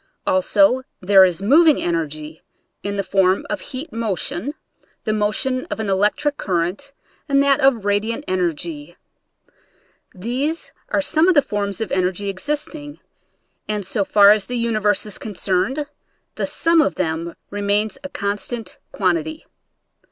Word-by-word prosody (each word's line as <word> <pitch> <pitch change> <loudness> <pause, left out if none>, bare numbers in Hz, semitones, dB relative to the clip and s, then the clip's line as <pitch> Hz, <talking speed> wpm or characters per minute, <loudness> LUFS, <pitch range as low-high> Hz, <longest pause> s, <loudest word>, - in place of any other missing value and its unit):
Also 260 -5 +3 0.2
there 190 +1 +6
is 180 0 +1
moving 305 +7 +5
energy 155 -2 -3 0.4
in 200 0 -3
the 200 - 0
form 190 -1 +2
of - - -2
heat 265 0 -7
motion, 225 - -2 0.5
the 215 - 0
motion 215 +5 -1
of - - -4
an 215 -2 -2
electric 245 +10 +1
current 185 +9 -2 0.4
and 275 0 +4
that 280 -1 +3
of 245 -6 +3
radiant 220 +7 0
energy. 185 - -3 1.2
These 255 - -2 0.2
i*re 290 - +1
some 315 +3 +3
of 370 - +4
the 290 - +5
forms 205 -1 -3
of 220 - -3
energy 185 +2 0
existing, 290 - -4 0.7
and 210 -2 -2
so 200 +2 0
far 200 +1 +6
as 210 -1 +2
the 245 - -3
universe 215 -4 +1
is 210 - -6
concerned 210 +7 -1 0.5
the - - -3
sum 330 -1 +3
of 305 - 0
them 165 -1 -2 0.2
remains 205 +1 -1
a 280 - -6
con 200 -6 -2
stant 235 0 -6
quantity. 165 -5 -1
210 Hz, 145 wpm, -21 LUFS, 190-275 Hz, 1.2 s, there